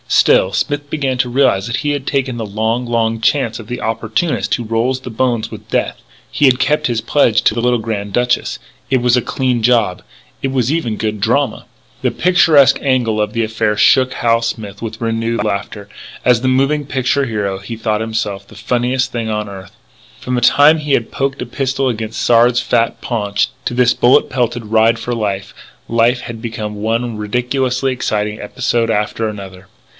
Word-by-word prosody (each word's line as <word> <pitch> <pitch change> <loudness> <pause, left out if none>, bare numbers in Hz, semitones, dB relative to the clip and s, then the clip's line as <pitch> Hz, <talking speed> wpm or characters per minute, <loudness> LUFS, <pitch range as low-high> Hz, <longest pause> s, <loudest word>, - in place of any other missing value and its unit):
Still, 95 - +4
Smith 145 +6 -2
began 135 -4 -1
to 125 -1 +1
realise 125 -6 +2
that 120 +2 -2
he - - +2
had 140 -2 -3
taken 135 -3 -1
the 115 - -3
long, 110 +4 -1
long 115 -1 0
chance 115 -2 +1
of 110 - -10
the 125 +1 -5
opportunist 115 +8 -1
who 120 - -5
rolls 115 +4 0
the 125 - -7
bones 120 -1 -1
with - - -11
Death. - - -1 0.3
He 145 - +2
had 130 -2 +4
kept 150 +3 +1
his 115 -2 -1
pledge 115 -2 +2
to - - +3
the 115 - -2
little 125 0 +2
Grand 105 -2 -4
Duchess. 125 +3 0 0.3
It 130 -2 +2
was 120 0 +3
a 125 - +2
clean 125 -2 -1
job. 115 -6 +2 0.4
It 135 - -1
was 130 -1 0
even 120 -10 -1
good 105 -2 -3
drama 125 +6 0 0.4
The - - +1
picturesque 165 -6 +4
angle 120 -6 +1
of 105 - -2
the 115 - 0
affair 110 -1 -1
shook 130 +2 +4
Hal 115 -1 +2
Smith 110 -3 -5
with 110 -1 -6
renewed 115 -1 -1
laughter. 100 0 -4 0.4
As 125 -1 +3
a - - +1
moving 135 +3 +1
picture 135 +1 0
hero 100 -5 -2
he 105 +4 -7
thought 110 -1 -1
himself 105 -3 -3
the - - -15
funniest 125 +1 -1
thing 115 -2 -3
on 105 -1 -2
earth. 95 -2 -10 0.4
From 125 - -3
the 120 - 0
time 145 +6 +5
he 150 -2 -2
had 115 - 0
poked 135 0 -2
a - - -6
pistol 135 +2 -1
against 110 -2 -3
Sard's 120 +1 +4
fat 120 -1 0
paunch, 105 -3 -1 0.2
to - - -2
this 125 0 +4
bullet 125 +4 +3
pelted 120 -3 -1
ride 110 +1 +3
for 120 +2 -3
life, 100 -4 -3 0.3
life 115 +2 +2
had 115 -1 -8
become 110 -2 -5
one 115 +1 -1
ridiculously 125 +4 -1
exciting 105 -4 -2
episode 115 +2 -1
after 110 +1 -1
another. 95 -3 -9
115 Hz, 190 wpm, -16 LUFS, 110-130 Hz, 0.4 s, time